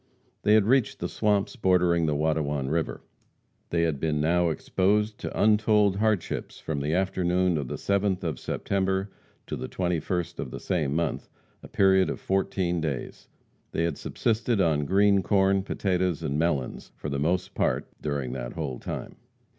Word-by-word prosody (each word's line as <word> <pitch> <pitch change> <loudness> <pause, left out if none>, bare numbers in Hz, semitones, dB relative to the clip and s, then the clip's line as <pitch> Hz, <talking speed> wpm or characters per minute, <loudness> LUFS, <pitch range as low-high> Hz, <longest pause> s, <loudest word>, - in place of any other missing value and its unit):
They 105 - +4
had 110 -2 +4
reached 130 +1 +2
the - - -3
swamps 105 -2 0
bordering 90 -4 +3
the 75 - +1
Watonwan 75 -3 0
river. 80 +1 -2 0.7
They 85 -1 +1
had 80 -4 0
been 75 -1 0
now 85 +3 +2
exposed 105 +7 0
to - - -5
untold 105 -2 +4
hardships 105 -4 -1
from 75 -3 -3
the 75 +3 0
afternoon 90 -1 +1
of 70 -4 -2
the - - -4
7th 100 -2 0
of 80 -7 -2
September 95 0 -1 0.3
to - - -4
the - - -5
21st 90 -1 -2
of - - -3
the - - -7
same 75 -6 -1
month, 80 -4 -2 0.3
a - - -11
period 95 -1 +3
of - - -4
fourteen 95 -3 0
days. 75 -5 -4 0.5
They 80 - 0
had 85 - 0
subsisted 115 0 0
on 80 -5 +2
green 100 +3 +4
corn, 95 0 +3
potatoes 90 -3 -1
and 75 -1 -1
melons 75 -6 -1
for - - -6
the 70 -1 -2
most 90 +5 0
part - - 0 0.2
during 70 -4 -2
that - - -5
whole 70 -6 -4
time. - - -6
90 Hz, 165 wpm, -27 LUFS, 80-95 Hz, 0.7 s, They